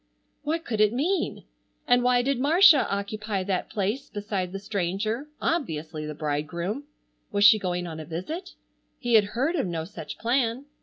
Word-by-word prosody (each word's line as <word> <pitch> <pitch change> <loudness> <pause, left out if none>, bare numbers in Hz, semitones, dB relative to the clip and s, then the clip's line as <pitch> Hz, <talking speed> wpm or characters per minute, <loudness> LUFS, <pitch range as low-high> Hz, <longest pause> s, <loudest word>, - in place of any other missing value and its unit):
What 320 +2 -2
could 220 -3 -1
it 215 +1 +4
mean? 335 +10 -1 0.4
And 245 0 +5
why 245 0 +3
did 275 -1 0
Marcia 315 +2 +6
occupy 200 0 -2
that 185 -1 -2
place 210 +7 -2
beside 205 -4 -3
the 195 - -4
stranger, 205 +5 -2
obviously 160 - -2
the 150 - -5
bridegroom? 165 - -3 0.5
Was 205 0 +2
she 215 +1 +8
going 180 -2 -2
on 160 -2 -6
a 155 - -7
visit? 185 - -6 0.4
He 240 -3 -2
had 215 -2 +7
heard 290 +8 +1
of 275 - 0
no 165 -2 -3
such 195 - -8
plan. 240 +2 0
210 Hz, 165 wpm, -26 LUFS, 180-260 Hz, 0.5 s, she